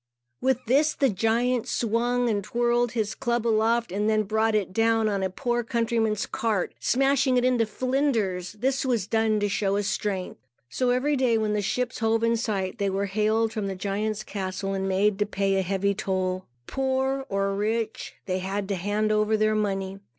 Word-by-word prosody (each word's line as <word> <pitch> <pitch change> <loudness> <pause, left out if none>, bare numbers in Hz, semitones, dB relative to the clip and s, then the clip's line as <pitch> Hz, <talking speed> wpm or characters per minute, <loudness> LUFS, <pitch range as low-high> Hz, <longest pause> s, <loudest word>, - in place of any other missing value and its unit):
With 260 -1 +1
this, 285 +6 +3
the 275 - +2
giant 230 +4 +1
swung 240 +2 0
and 205 -3 0
twirled 240 +2 +1
his 220 -3 -1
club 240 -2 -1
aloft 230 0 +2
and 205 +3 0
then 215 0 +2
brought 220 +2 +1
it 195 -3 -1
down 225 +1 +2
on 200 -2 0
a 190 - 0
poor 240 +4 -1
countryman's 230 -2 0
cart, 215 -5 -1
smashing 270 0 +2
it 245 - +2
into 245 -3 +2
flinders. 220 -7 -1
This 260 +5 -1
was 240 -7 0
done 220 0 +1
to 205 - +2
show 195 0 0
his 205 0 0
strength. 195 -4 -3 0.3
So 255 -1 0
every 260 +4 +2
day, 250 -4 +2
when 215 -1 0
the 210 - 0
ships 250 +5 -2
hove 225 0 +1
in 230 0 +3
sight, 200 -5 -2
they 200 -1 +1
were 195 +1 -1
hailed 215 +3 +1
from 215 -3 -2
the 195 - -3
giant's 210 +3 -2
castle 195 -1 -4
and 195 0 -1
made 195 +2 +2
to 205 - +1
pay 195 -1 +1
heavy 195 +2 0
toll. 185 -1 -2 0.2
Poor 265 - -1
or 195 0 0
rich, 220 +2 -2
they 185 -1 -1
had 195 +2 -3
to 200 - 0
hand 205 +4 0
over 215 +1 +2
their 215 0 +2
money. 195 -2 -2
215 Hz, 185 wpm, -26 LUFS, 200-240 Hz, 0.3 s, this